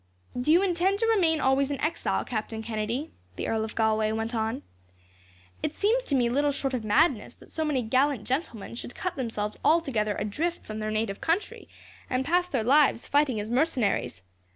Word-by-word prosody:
"Do 250 +5 +1
you 350 +4 +5
intend 375 +1 +1
to 455 - +1
remain 360 -8 +3
always 270 0 +2
an 280 -2 -3
exile, 310 +2 -1
Captain 220 -1 -4
Kennedy?" 230 +6 -3 0.2
the - - -3
Earl 220 -1 0
of 220 - -6
Galway 220 -1 +2
went 225 +2 -2
on. 225 +4 -2 1.0
"It 305 - -2
seems 460 +5 +2
to 280 - 0
me 245 -2 +3
little 285 +4 +2
short 270 -1 -2
of 245 -3 -2
madness 240 +2 +2
that - - -18
so 320 - -2
many 290 -5 0
gallant 255 +1 +1
gentlemen 250 - -3
should 240 +1 -7
cut 365 -1 -3
themselves 220 -5 -3
altogether 260 -11 +2
adrift 320 +12 -2
from 215 0 -6
their 215 0 -2
native 215 -2 -2
country, 335 +5 -2 0.4
and 255 +1 0
pass 355 +3 +2
their 260 -10 -1
lives 275 0 +3
fighting 285 -6 +2
as 210 +2 -5
mercenaries. 245 - 0
260 Hz, 185 wpm, -27 LUFS, 220-315 Hz, 1.0 s, you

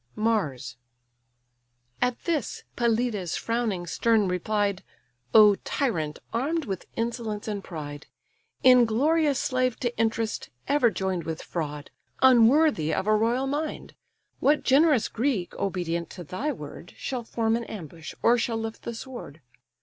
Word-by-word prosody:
MARS 210 - -1 1.2
At 245 -1 0
this, 315 -8 -2
Pelides, 230 -6 0
frowning 230 -6 -1
stern, 220 +3 +2
replied: 200 +2 0 0.5
"O 210 -2 +8
tyrant, 160 - -1 0.2
arm'd 290 +7 0
with 195 -5 -5
insolence 230 -2 -3
and 205 -2 -3
pride! 145 -4 -7 0.6
Inglorious 260 +5 +4
slave 255 -2 0
to 240 -1 -1
interest, 225 0 -1 0.2
ever 285 -5 +4
join'd 190 -3 -2
With 160 -1 -4
fraud, 150 -4 -5 0.3
unworthy 255 - +5
of 190 - -1
a 215 0 +4
royal 235 +5 +1
mind! 295 +3 -3 0.5
What 300 +2 +3
generous 275 -3 +4
Greek, 230 -7 -1
obedient 170 -3 -2
to 175 - -6
thy 185 - -3
word, - - -9
Shall 255 -3 -4
form 225 0 0
an 235 0 -3
ambush, 165 -6 -8
or 235 +1 +5
shall 230 0 -1
lift 225 0 -5
the 235 - -5
sword? 240 - -8
225 Hz, 130 wpm, -26 LUFS, 185-250 Hz, 1.2 s, O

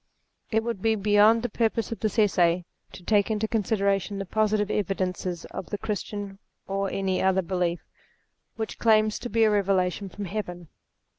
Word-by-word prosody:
It 220 0 +1
would 230 -5 -3
be 225 +1 +2
beyond 210 +2 +4
the - - +1
purpose 225 +1 0
of 230 - -4
this 215 0 -2
Essay, 180 -5 +3 0.3
to 180 - -12
take 205 +1 +2
into 220 0 0
consideration 200 -2 0
the 195 - -4
positive 215 +1 +1
evidences 185 -3 -2
of 185 - -6
the 205 - -3
Christian, 205 -2 -5 0.3
or 195 0 -1
any 190 -1 -1
other 190 0 +2
belief, 175 -1 -1 0.7
which 220 -1 -5
claims 215 -1 +3
to 245 - -6
be 230 -1 +2
a 215 - +4
revelation 195 -1 +1
from 205 +2 -6
Heaven. 175 -4 -5
205 Hz, 165 wpm, -26 LUFS, 190-215 Hz, 0.7 s, beyond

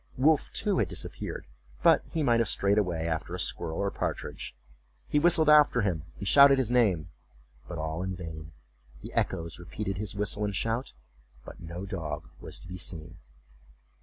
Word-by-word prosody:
Wolf, 150 +4 +3
too, 205 -3 +1
had 100 - +2
disappeared, 90 - -5 0.4
but - - +5
he 160 -2 -1
might 120 -4 +3
have 115 -2 +2
strayed 100 0 +3
away 85 -5 -1
after 80 -1 -3
a - - -5
squirrel 80 -1 +1
or 100 0 0
partridge. - - -4 0.5
He 150 - +2
whistled 160 -1 +4
after 150 -5 +6
him 85 -7 -1
and 100 - -5
shouted 140 +2 +7
his 125 -3 +1
name, 100 -11 +2 0.6
but 85 - -6
all 80 +2 -3
in 95 0 -3
vain; 80 -3 -8 0.5
the - - -8
echoes 85 0 -1
repeated 95 +2 -5
his 105 -1 -4
whistle 105 +1 -1
and 100 -1 -2
shout, 115 +5 -2 0.5
but - - -11
no 85 +2 -7
dog 80 -7 -5
was - - -8
to - - -13
be 90 0 -7
seen. 85 0 -6
95 Hz, 175 wpm, -28 LUFS, 85-120 Hz, 0.6 s, shouted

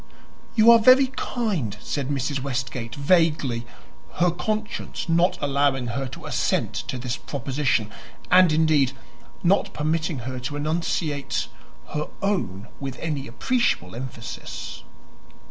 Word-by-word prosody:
"You 225 +1 +8
are 230 - +8
very 255 +3 +6
kind," 185 - -2
said 140 +3 -3
Mrs. 140 0 -1
Westgate, 130 -3 -3
vaguely 140 -6 +2 0.5
her 175 0 +3
conscience 215 +5 -3
not 170 +2 +3
allowing 140 -2 +1
her 135 +3 -2
to 125 - -10
assent - - 0
to 130 - -4
this 125 0 -3
proposition 130 -5 -1 0.4
and, 180 -2 +7
indeed, 155 -4 +3 0.5
not 190 +3 +3
permitting 155 +1 0
her 130 0 -4
to 130 +4 -4
enunciate 145 - -1 0.4
her 150 0 -2 0.2
own 120 - -1
with 135 -2 -5
any 150 -4 -3
appreciable 120 - 0
emphasis. 120 -1 -7
145 Hz, 120 wpm, -24 LUFS, 125-170 Hz, 0.5 s, You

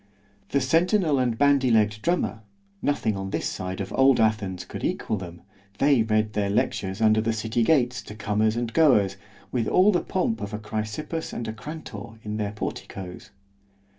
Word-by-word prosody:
The - - +1
centinel 165 +2 +2
and 120 -3 0
bandy 140 -2 +4
legg'd 105 -2 +2
drummer!——nothing 105 - -2
on 95 0 -4
this - - -2
side 95 +1 -4
of 95 - -4
old 135 -1 +5
Athens 100 -5 0
could - - -8
equal - - -1
them! 85 -2 -8 0.4
they 140 -4 +4
read 110 -1 +1
their 100 -1 0
lectures 100 0 -1
under 110 0 +5
the 115 +1 0
city 110 +2 -1
gates 125 -1 +2
to 105 - -9
comers 110 +1 +1
and 120 -1 -2
goers, 105 -12 +4 0.4
with 120 -4 0
all 190 +3 +5
the 175 - +1
pomp 115 - -1
of 100 +1 -4
a - - -3
Chrysippus 110 +10 -4
and 120 - -4
a 110 - -3
Crantor 115 -4 -8
in 105 0 -4
their 105 -1 -2
porticos. 95 -3 -6
110 Hz, 170 wpm, -25 LUFS, 105-130 Hz, 0.4 s, old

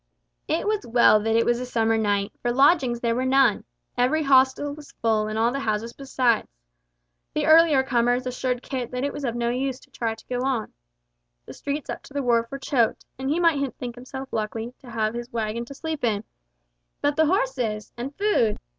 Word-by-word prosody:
It 320 - 0
was 425 -1 0
well 235 -2 +5
that 225 +1 0
it 230 - +3
was 240 0 +2
a 250 - -4
summer 225 -2 +1
night, 205 -2 0
for 240 - 0
lodgings 265 -2 +3
there 235 -1 +1
were 250 +2 -1
none. 260 -4 +3 0.3
Every 255 +6 +2
hostel 270 +1 +3
was 295 0 -13
full 220 -2 0
and 215 0 -3
all 230 +2 +2
the 275 - -2
houses 225 -2 -2
besides. 255 -4 0 0.9
The - - +1
earlier 315 -4 +6
comers 245 -1 +1
assured 250 0 -2
Kit 255 -3 -4
that 250 +1 -4
it 285 - -1
was 290 - -6
of 240 -3 -1
no 235 0 0
use 260 +1 -2
to - - -21
try 225 -2 -2
to 225 - -18
go 250 -1 -2
on. 260 -5 -1 0.7
The - - -10
streets 285 0 -4
up - - -5
to 280 - -16
the 280 - -1
wharf 235 -1 +2
were 275 - -5
choked, 255 -4 0
and 265 0 -2
he 310 +4 +1
might 290 -6 +2
think 245 -2 -5
himself 265 +2 -9
lucky 225 +2 -3
to 255 - -14
have 220 -1 -1
his 240 +1 -6
waggon 230 0 -2
to 280 - -10
sleep 315 -1 -5
in. 215 -3 +1 0.8
But 290 0 +1
the 315 0 +3
horses! 255 - -1
And 260 +4 -6
food? 395 - +2
250 Hz, 210 wpm, -24 LUFS, 230-275 Hz, 0.9 s, earlier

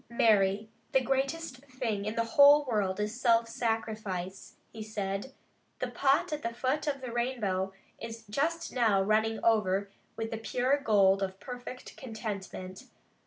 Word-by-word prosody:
"Mary, 210 -3 +3 0.3
the 265 - +6
greatest 270 +3 -1
thing 230 -6 -3
in 215 +1 -3
the 230 - +2
whole 285 +5 +7
world 205 -6 0
is 210 +4 -3
self 230 -2 +4
sacrifice," 215 -5 -3 0.2
he 225 - -7
said. 205 +2 -4 0.5
"The 255 - -3
pot 275 +4 +2
at 300 - -3
the 230 -3 -3
foot 265 +5 -1
of 280 -2 -1
the 255 -2 -5
rainbow 215 -6 -1 0.3
is 230 0 -7
just 320 +10 -1
now 220 -6 +3
running 220 +2 +2
over 200 -3 +2 0.2
with 225 0 -4
the 225 - -3
pure 250 +5 +1
gold 200 -6 +4
of 190 0 -3
perfect 250 +2 -8
contentment. 200 -6 -6
225 Hz, 150 wpm, -30 LUFS, 205-255 Hz, 0.5 s, whole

